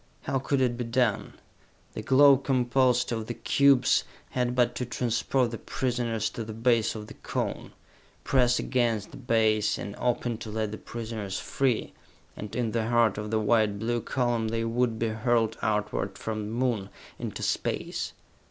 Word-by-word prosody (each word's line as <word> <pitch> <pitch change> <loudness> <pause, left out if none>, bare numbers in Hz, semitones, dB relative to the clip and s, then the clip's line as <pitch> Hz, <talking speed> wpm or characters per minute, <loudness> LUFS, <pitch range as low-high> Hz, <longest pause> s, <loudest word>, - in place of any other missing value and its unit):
How 135 - 0
could 135 +1 0
it 120 -2 +1
be - - 0
done? 115 -2 0 0.6
The - - -5
globe 140 0 +6
composed 125 -1 +2
of 110 -2 -3
the 120 - -4
cubes 140 +3 +4 0.3
had 125 -1 0
but 120 -1 +3
to 125 - -2
transport 125 +1 0
the 115 - -5
prisoners 120 -3 -1
to 115 - -5
the 110 0 -7
base 115 -1 +2
of 105 -1 -6
the - - -11
Cone, - - -4 0.5
press 125 -2 +3
against 115 -5 0
that 130 - -12
base, 110 -2 +2
and 100 - -6
open 120 -2 -1
to 110 - -7
let 110 -1 -2
the 110 - -6
prisoners 110 -4 -5
free 130 -4 -1 0.4
and 105 - -7
in 120 -3 0
the 115 0 -1
heart 115 -3 +3
of 105 0 -4
the 110 0 +1
white 110 -1 +2
blue 120 +2 -1
column 120 -1 0
they 115 +1 -1
would 115 0 0
be 115 0 0
hurled 115 0 +1
outward 105 -2 -1
from 110 0 -4
the 105 - -5
Moon, 115 -5 -1 0.3
into - - -5
space. - - -2
115 Hz, 170 wpm, -27 LUFS, 110-125 Hz, 0.6 s, globe